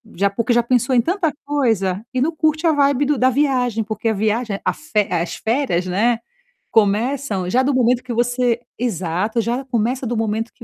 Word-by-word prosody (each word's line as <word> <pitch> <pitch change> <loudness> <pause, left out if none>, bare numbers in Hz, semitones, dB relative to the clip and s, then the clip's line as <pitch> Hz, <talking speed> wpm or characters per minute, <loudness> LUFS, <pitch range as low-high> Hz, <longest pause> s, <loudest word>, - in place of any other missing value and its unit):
Já, 200 +3 +2
porque 230 +5 0
já 240 - +4
pensou 245 +1 +1
em 240 - +5
tanta 345 - 0
coisa, 220 -9 0
e 255 - 0
não 315 +4 0
curte 315 +1 0
a - - +5
vibe 285 -1 +2
do 290 0 +1
da 255 +1 +4
viagem 250 -4 +1
porque 215 +1 -2
a - - +1
viagem 215 0 -1
a - - +1
fe 215 -10 -1
a 170 -2 +1
as 170 - -4
férias, 225 -7 0
né, 220 +6 +1 0.5
começam 215 -1 +1
já 255 +7 +2
do 280 +2 +1
momento 250 -1 +2
que 250 -1 -5
você 240 0 +1 0.2
Exato, 210 0 -1
já 240 +4 -2
começa 250 +1 -1
do 240 0 -2
momento 225 +1 -2
que 235 - -15
240 Hz, 205 wpm, -20 LUFS, 215-260 Hz, 0.5 s, em